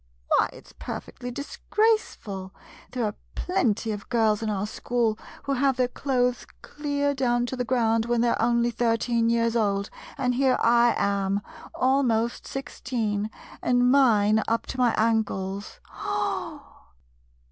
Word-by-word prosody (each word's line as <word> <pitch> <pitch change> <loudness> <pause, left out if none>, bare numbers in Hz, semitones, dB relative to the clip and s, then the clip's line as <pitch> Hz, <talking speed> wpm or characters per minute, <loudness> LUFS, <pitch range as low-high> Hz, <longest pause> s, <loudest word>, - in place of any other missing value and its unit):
Why, - - +3
it - - -14
's - - -17
per - - -4
fectly 245 0 -9
disgraceful. 280 - -1 0.3
There 245 -2 -2
are 210 - -1 0.2
plenty 235 - 0
of 205 -1 -6
girls 220 -3 +2
in 220 - -1
our 205 -1 -1
school 225 0 -1 0.2
who 280 - -1
have 270 0 +2
their 250 -1 +2
clothes 250 -2 0 0.2
clear 285 -1 -1
down 240 -3 +1
to 250 - -4
the 250 - -1
ground 230 -2 +1
when 240 -1 +2
they 240 - +3
're - - 0
only 235 0 +2
thir 230 0 +1
teen 230 0 +1
years 230 0 +1
old, 200 -3 0 0.3
and 250 -1 +1
here 260 0 +3
I 235 0 +4
am, 200 0 0 0.3
almost 245 -3 +1
sixteen, 225 -6 -3 0.3
and 245 0 +3
mine 220 -6 +4
up 230 0 0
to 260 - -7
my 245 -2 +3
ankles. 205 -3 -1
[Gasps. - - -3
235 Hz, 150 wpm, -26 LUFS, 220-255 Hz, 0.3 s, I